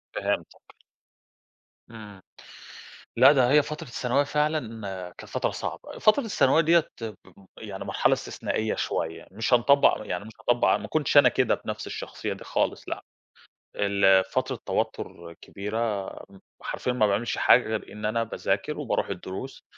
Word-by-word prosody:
فهمتك. - - -4 1.1
إمم، 105 -4 -11 1.0
لأ 130 +4 +8
ده 130 -3 +3
هي 150 +1 +6
فترة 150 0 -7
الثانوية 125 +3 0
فعلًا 150 -6 -1 0.4
كانت - - -12
فترة - - 0
صعبة، - - -6
فترة 215 +6 +4
الثانوية 160 -7 +3
ديَّة 165 0 +4 0.2
اب 110 -3 -5 0.4
يعني 100 -3 -7
مرحلة - - +2
استثنائية 110 0 -2
شوية، 80 0 -3
مش 110 +5 -1
هنطبّق 140 +4 +5
يعني 90 +3 -3
مش 110 - -11
هاطبّق 120 0 +2
ما - - -7
كنتش 150 -1 +1
أنا 135 -3 +8
كده 125 0 +2
بنفس - - -5
الشخصية - - -5
دي - - -11
خالص - - -2
لأ، - - -5 0.7
ال 100 -2 +4
فترة 130 +4 -2
توتر 85 0 -3
كبيرة 105 0 -3 0.2
م 95 - -15 0.2
حرفيًا 125 - -2
ما 115 -4 +3
باعملش 105 +4 -1
حاجة 120 -1 +5
غير 110 -1 -4
إن 105 - -9
أنا 110 +2 +1
باذاكر 115 - -2
وباروح - - -1
الدروس 100 +9 -7
115 Hz, 145 wpm, -26 LUFS, 105-135 Hz, 1.1 s, لأ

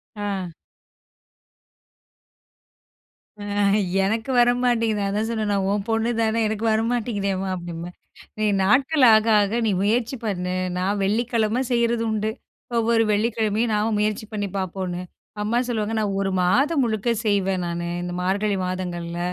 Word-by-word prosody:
ஆ. 195 -4 -3 2.9
ஆ - - -7 0.6
எனக்கு 220 +6 -1
வர 240 0 +5
மாட்டேங்குது. 225 -4 +1
அதான் 210 +2 -1
சொன்னேன். 215 -3 -1
நான் 195 -1 0
உன் 205 0 -1
பொண்ணு 225 +1 +1
தானே 220 0 +1
எனக்கு 220 +1 -3
வரமாட்டேங்குதேம்மா! 215 -4 -1
அப்படிம்பேன். 175 0 -7 0.5
நீ 215 - +1 0.2
நாட்கள் 270 +7 +3
ஆக, 215 0 +4 0.2
ஆக 210 +4 0
நீ 210 - +2
முயற்சி 230 +5 +1
பண்ணு. 180 -3 -2 0.2
நான் 200 +3 0
வெள்ளிக்கிழமை 225 +2 +1
செய்யறது 235 -1 +1
உண்டு. 215 0 -1 0.5
ஒவ்வொரு 230 0 +3
வெள்ளிக்கிழமையும் 220 +1 0
நான் 210 +1 +1
முயற்சி 215 0 -1
பண்ணி 205 -1 -2
பார்ப்போம்ன்னு. 185 -1 -3 0.4
அம்மா 220 +3 0
சொல்லுவாங்க 220 -2 -2
நான் 200 -2 -1
ஒரு 195 -1 -1
மாதம் 275 - +2
முழுக்க 220 0 -1 0.2
செய்வேன் 195 -3 +1
நானு 170 0 -3 0.2
இந்த 175 0 -4
மார்கழி 200 +2 0
மாதங்கள்ல. 175 -2 -4
210 Hz, 130 wpm, -23 LUFS, 195-225 Hz, 2.9 s, வர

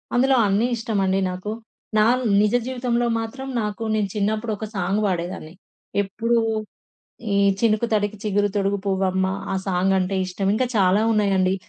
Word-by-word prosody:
అందులో 265 +2 +4
అన్నీ 205 +5 +2
ఇష్టమండి 200 -4 0
నాకు. 185 +3 -5 0.5
నా 215 - +5 0.4
నిజ 210 +3 +2
జీవితంలో 245 -2 0
మాత్రం, 265 +4 -6
నాకు 210 +1 -4
నేను 210 -2 +1
చిన్నప్పుడు 215 +2 -1
ఒక 220 - -5
సాంగ్ 195 +2 0
పాడేదాన్ని 175 -3 -4 0.5
ఎప్పుడు 230 +4 -1 1.0
ఈ - - +2 0.2
'చినుకు 220 +1 +2
తడికి 205 0 0
చిగురు 205 -1 +1
తొడుగు 200 0 +1
పువ్వు 190 -1 0
అమ్మ' 190 +1 0 0.2
ఆ - - 0
సాంగ్ 190 0 +1
అంటే 185 +1 -1
ఇష్టం. 190 +2 -3
ఇంకా 255 +3 +1
చాలా 195 +1 +4
ఉన్నాయండి. 195 -3 +2
205 Hz, 150 wpm, -22 LUFS, 190-220 Hz, 1.0 s, నా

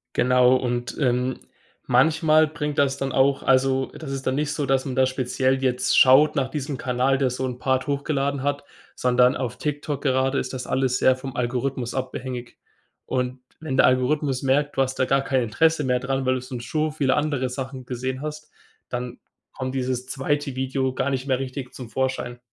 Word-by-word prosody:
Genau, 125 0 +4
und, 120 -1 -2
ähm, 125 -1 0 0.5
manchmal 155 +4 +4
bringt 150 -1 -4
das 140 -1 +2
dann 135 -1 -2
auch 135 +1 +3
also, 130 0 +2
das 145 -4 -7
ist 135 -1 -5
dann 130 - +1
nicht 150 0 -1
so, 145 - -2
dass 135 0 +1
man 130 - -4
da 130 - +3
jetzt 130 - +3
speziell 130 +1 0 0.2
schaut 135 +4 +5
nach 130 -1 0
diesem 145 -2 -4
Kanal, 130 +2 +1
der 135 -2 +1
so 130 +1 -3
'n 125 -1 -4
Part 130 +2 0
hochgeladen 140 -1 -1
hat, 145 0 -1 0.3
sondern 125 0 +3
auf 125 -2 -4
TikTok 145 -1 -3
gerade 135 0 +1
ist 130 - -4
das 125 -1 -5
alles 130 -1 +1
sehr 130 - +4
vom 130 0 -8
Algorithmus 125 0 -2
abhängig. 130 -1 -5 0.5
Und 125 0 -2 0.2
wenn 155 -4 -4
der - - +6
Algorithmus 130 +1 +1
merkt, 145 +2 +1
du 135 - +4
hast 130 0 -3
da 130 - +3
gar 135 +1 +2
kein 130 -2 +1
Interesse 155 +8 +2
mehr 125 -2 +1
dran, 135 +1 -2
weil 130 0 +2
du 125 - -3
schon 125 -1 -7
so 155 +6 -1
viele 140 -4 +1
andere 145 -4 0
Sachen 130 0 -6
gesehen 130 +1 -4
hast, 150 0 -7 0.4
dann 125 0 -5 0.3
kommt 130 0 -5
dieses 125 -1 -2
2. 140 0 -2
Video 130 0 -1
gar 140 - -1
nicht 130 -1 -2
mehr 130 -2 +1
richtig 130 -1 -6
zum 125 -3 -9
Vorschein. 130 0 -2
130 Hz, 195 wpm, -24 LUFS, 125-140 Hz, 0.5 s, der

